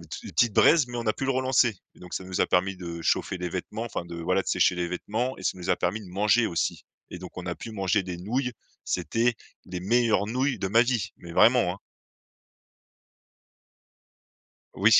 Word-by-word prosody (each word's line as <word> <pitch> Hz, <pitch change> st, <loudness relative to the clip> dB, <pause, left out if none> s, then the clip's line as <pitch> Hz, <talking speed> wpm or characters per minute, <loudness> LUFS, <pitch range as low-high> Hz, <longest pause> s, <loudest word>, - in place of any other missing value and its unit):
tu -, -, -7 dB
petites 120 Hz, -3 st, +3 dB
braises, 155 Hz, -6 st, +6 dB
mais 120 Hz, -, -6 dB
on 115 Hz, -, -4 dB
a 110 Hz, -, +3 dB
pu 135 Hz, -, -5 dB
le -, -, +2 dB
relancer, 130 Hz, -4 st, +2 dB, 0.2 s
et -, -, -20 dB
donc 90 Hz, 0 st, -8 dB
ça 95 Hz, -, -4 dB
nous 95 Hz, 0 st, -3 dB
a -, -, +4 dB
permis 95 Hz, +2 st, +1 dB
de 85 Hz, -2 st, -6 dB
chauffer 95 Hz, -, 0 dB
les 90 Hz, 0 st, -3 dB
vêtements, 105 Hz, +5 st, -4 dB
enfin 105 Hz, -6 st, -4 dB
de, 85 Hz, 0 st, -7 dB
voilà, 90 Hz, +3 st, +1 dB
de -, -, -24 dB
sécher -, -, +3 dB
les 85 Hz, -1 st, -1 dB
vêtements 110 Hz, +8 st, -2 dB
et -, -, -10 dB
ça 95 Hz, -, -1 dB
nous 90 Hz, -, -7 dB
a -, -, +3 dB
permis 110 Hz, -, -1 dB
de 100 Hz, -, -11 dB
manger 105 Hz, +4 st, +3 dB
aussi, 85 Hz, -, -2 dB, 0.3 s
et 90 Hz, -, -7 dB
donc 90 Hz, 0 st, -10 dB
on 90 Hz, -, -6 dB
a 90 Hz, -, -2 dB
pu 115 Hz, -, -8 dB
manger 95 Hz, -1 st, +1 dB
des 90 Hz, -1 st, -5 dB
nouilles, 125 Hz, +7 st, -1 dB, 0.3 s
c'était 120 Hz, +1 st, 0 dB, 0.3 s
les 90 Hz, -1 st, -5 dB
meilleures 115 Hz, 0 st, +2 dB
nouilles 130 Hz, +4 st, 0 dB
de 95 Hz, -, -2 dB
ma 115 Hz, +4 st, +5 dB
vie, 120 Hz, -4 st, -1 dB
mais 85 Hz, -1 st, -10 dB
vraiment, 115 Hz, -3 st, +5 dB
hein! -, -, -14 dB, 3.0 s
Oui, -, -, +4 dB
100 Hz, 210 wpm, -27 LUFS, 90-120 Hz, 3.0 s, braises